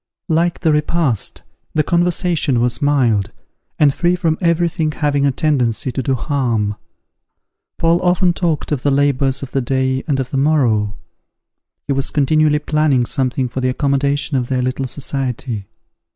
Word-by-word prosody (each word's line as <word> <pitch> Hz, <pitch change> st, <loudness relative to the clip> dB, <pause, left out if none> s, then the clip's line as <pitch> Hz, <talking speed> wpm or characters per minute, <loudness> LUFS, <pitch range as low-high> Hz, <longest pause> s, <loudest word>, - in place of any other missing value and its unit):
Like 170 Hz, +2 st, +1 dB
the 160 Hz, -, +2 dB
repast, 150 Hz, -, 0 dB, 0.3 s
the 155 Hz, -, +3 dB
conversation 170 Hz, -5 st, +1 dB
was 120 Hz, +4 st, 0 dB
mild, 125 Hz, -9 st, +2 dB, 0.5 s
and 145 Hz, -2 st, +4 dB
free 175 Hz, +3 st, +1 dB
from 165 Hz, -3 st, 0 dB
every 170 Hz, 0 st, +2 dB
thing 160 Hz, -2 st, -1 dB
having 145 Hz, -2 st, +1 dB
a -, -, +2 dB
tendency 130 Hz, -4 st, 0 dB
to 130 Hz, -, -3 dB
do 130 Hz, +1 st, 0 dB
harm. 120 Hz, -6 st, -1 dB, 1.0 s
Paul 165 Hz, +1 st, +2 dB
often 180 Hz, 0 st, +2 dB
talked 165 Hz, -5 st, -2 dB
of 145 Hz, -4 st, -1 dB
the 145 Hz, -, +1 dB
labours 140 Hz, -1 st, +1 dB
of 135 Hz, -, -7 dB
the 135 Hz, -, 0 dB
day 130 Hz, +1 st, 0 dB
and 140 Hz, -3 st, 0 dB
of 130 Hz, -1 st, -3 dB
the 135 Hz, -, -1 dB
morrow. 120 Hz, -8 st, +1 dB, 0.9 s
He 140 Hz, -, 0 dB
was 135 Hz, 0 st, 0 dB
continually 150 Hz, +1 st, +2 dB
planning 150 Hz, -4 st, +1 dB
something 130 Hz, 0 st, 0 dB
for 130 Hz, +2 st, -5 dB
the 130 Hz, -, +1 dB
accommodation 140 Hz, +1 st, 0 dB
of 125 Hz, -2 st, -1 dB
their 130 Hz, -1 st, -1 dB
little 130 Hz, +1 st, -2 dB
society. 125 Hz, -6 st, -4 dB
140 Hz, 160 wpm, -18 LUFS, 130-155 Hz, 1.0 s, and